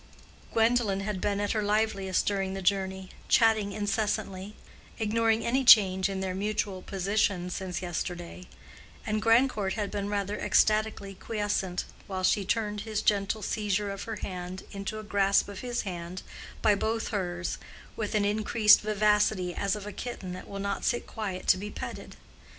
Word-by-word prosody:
Gwendolen 225 -3 +2
had 195 -2 -3
been 205 -1 0
at 205 0 0
her 215 - 0
liveliest 205 -3 +1
during 195 -1 -1
the 195 - -5
journey, 190 0 0 0.2
chatting 220 -3 +4
incessantly, 205 -1 -2 0.4
ignoring 225 +1 +1
any 260 +3 +2
change 195 -5 +7
in 190 -1 -3
their 190 -1 -2
mutual 200 -1 -2
position 195 -1 0
since 185 -1 -4
yesterday; 175 +1 -5 0.6
and 215 0 -1
Grandcourt 225 -3 +3
had 210 -3 -3
been 205 -1 -3
rather 205 0 -2
ecstatically 215 -2 +2
quiescent, 205 -3 -2 0.2
while 190 -1 -4
she 200 +2 +3
turned 210 +1 -1
his 215 -1 -3
gentle 205 +1 +1
seizure 205 -1 -1
of 195 - -6
her 225 - -4
hand 185 -1 -6
into 200 +2 -5
a 215 - -6
grasp 200 -1 +2
of 200 -1 -8
his 245 -1 -2
hand 180 -1 -6 0.4
by 215 - +6
both 220 +3 -1
hers, 180 -4 -3 0.4
with 215 -1 -3
an 205 -1 +2
increased 210 +1 +5
vivacity 210 -3 +2
as 200 +3 0
of 205 -1 -7
a 210 - -6
kitten 190 -7 -6
that 185 - -8
will 200 - -7
not 200 0 -3
sit 240 - 0
quiet 195 -5 -5
to - - +5
be 205 +2 -5
petted. - - -7
205 Hz, 160 wpm, -28 LUFS, 190-215 Hz, 0.6 s, change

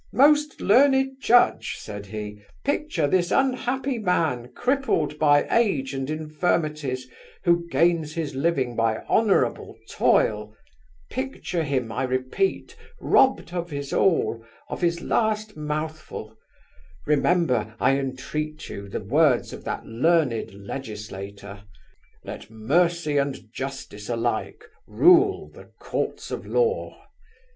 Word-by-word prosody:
'Most 295 +2 +4
learned 265 +4 +4
judge!' 245 -1 +3
said 100 -1 -8
he, 105 0 -7 0.2
'picture 285 - 0
this 175 +3 +2
unhappy 265 -1 0
man, 155 - 0
crippled 245 - 0
by 145 -1 +4
age 155 - +1
and 135 0 -3
infirmities, 155 -4 -1 0.4
who 170 -1 +2
gains 165 -3 +1
his 160 -4 -3
living 135 -4 0
by 115 -1 0
honourable 215 -3 +1
toil—picture 110 - -2
him, 135 -7 -1
I 130 - -1
repeat, 130 - -1 0.2
robbed 265 -9 +3
of 175 -1 -3
his 140 -2 -5
all, 155 -10 +2 0.3
of - - -5
his 170 -1 +1
last 215 -1 0
mouthful; 155 0 -5 0.7
remember, 140 - +1
I 135 +1 +3
entreat 150 +3 -4
you, 100 0 -7
the 100 - -4
words 140 +4 +2
of - - -9
that - - -4
learned 130 0 +1
legislator, 100 -2 -8 0.6
"Let - - -8
mercy 150 +7 +1
and 135 -5 -2
justice 130 -6 -6
alike 120 - -2 0.2
rule 365 +3 +4
the - - -13
courts - - -4
of - - -5
law." 475 0 -1
150 Hz, 115 wpm, -24 LUFS, 125-185 Hz, 0.7 s, Most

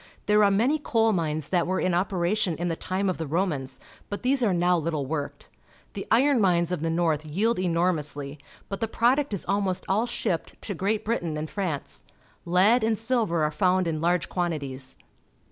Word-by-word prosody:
There 210 0 +4
are 200 - +5
many 240 +10 +2
coal 225 -5 +2
mines 155 -4 -2
that 175 -2 +1
were 185 +1 0
in 185 - +1
operation 180 0 0
in 175 +3 -2
the 165 - -1
time 185 +4 -2
of 185 - -1
the 160 - -3
Romans, 150 -5 -2 0.3
but 205 - -5
these 260 +1 +2
are 225 -5 +3
now 175 -1 +2
httle 155 -3 -2
worked. 145 0 -5 0.4
The 195 - -6
iron 255 +2 +4
mines 175 -3 +2
of 180 - -2
the 165 - -1
north 160 -2 0
jdeld 215 +6 +1
enormously, 155 -5 -1 0.3
but 195 - -5
the 225 - +1
product 255 +5 +2
is 200 - -2
almost 195 -2 0
all 215 +5 +1
shipped 180 -7 -3
to 205 - -3
Great 205 +4 -1
Britain 175 -9 -1
and 155 +1 -3
France. 180 -8 -4 0.4
Lead 195 +7 +4
and 220 0 +1
silver 225 -8 0
are 150 - +1
found 185 +1 +2
in 155 -2 -2
large 175 0 +1
quantities. 140 -7 -3
180 Hz, 190 wpm, -26 LUFS, 165-210 Hz, 0.4 s, are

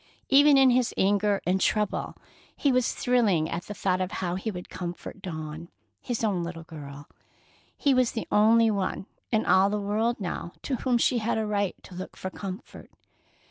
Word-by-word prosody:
Even 285 +1 +7
in 265 -1 +6
his 250 -1 +1
anger 200 +1 +2
and 185 +1 +1
trouble, 210 +1 0 0.4
he 285 - +2
was 255 -1 +2
thrilling 215 -11 +2
at 170 +2 -4
the 210 - -7
thought 185 -2 0
of 185 +2 -3
how 175 -2 -2
he 190 +5 -3
would 180 -4 -6
comfort 175 +2 -7
Dawn, 160 -1 -6 0.3
his 240 -2 -3
own 200 -5 +1
little 170 -1 -6
girl. 145 -3 -10 0.7
He 280 - +3
was 255 -2 +2
the 225 - -4
only 225 +2 +5
one 195 -2 -2 0.3
in 220 -2 +2
all 190 +1 +5
the 210 - -1
world 220 +4 0
now 175 -2 -4
to 265 - -1
whom 250 -1 +1
she 240 +1 +2
had 225 +1 -1
a 220 - 0
right 205 -2 -1
to - - -13
look 185 +1 -7
for 185 - -5
comfort. 195 +2 -8
200 Hz, 185 wpm, -27 LUFS, 180-230 Hz, 0.7 s, Even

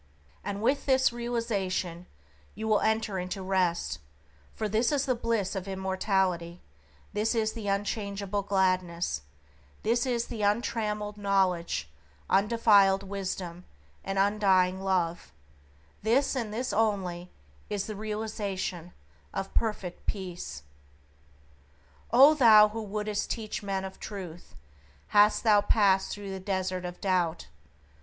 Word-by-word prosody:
And 200 +1 -4
with 275 +5 +1
this 260 -2 +4
realization 200 -7 -2 0.5
you 220 +3 -4
will 215 -1 +4
enter 220 -3 0
into 185 +2 -4
rest, 175 - 0 0.6
for 215 - -2
this 220 +5 +1
is 280 -2 +1
the 255 - +2
bliss 230 -5 -1
of 190 0 -4
immortality, 190 -2 -1 0.5
this 215 +3 +1 0.2
the 220 -3 -6
unchangeable 200 0 -2
gladness, 185 - 0 0.6
this 235 +3 +2 0.2
the 225 -3 -6
untrammeled 210 0 -1
knowledge, 185 - +1 0.4
undefiled 200 -2 +4
Wisdom, 185 -3 -5 0.4
and 195 - -3
undying 190 -2 +3
Love; 175 -3 -1 0.7
this, 250 +7 +2
and 230 -5 -2
this 245 +4 -2
only, 190 -5 0 0.4
is 200 -1 -2
the 215 - -5
realization 200 -5 -4 0.4
of 195 0 -4
Perfect 210 -6 -2
Peace. 175 - -5 1.5
O 270 +6 +8
thou 220 -7 +7
who 225 +1 -5
wouldst 210 0 -3
teach 220 -3 -3
men 195 -1 -2
of 190 - -9
Truth! 180 -5 -8 0.5
Hast 210 +1 +5
thou 210 -3 +5
passed 200 -2 +3
through 205 -1 -6
the 190 - -5
desert 185 -1 -2
of 175 0 -6
doubt? 180 -4 0
200 Hz, 120 wpm, -28 LUFS, 185-215 Hz, 1.5 s, O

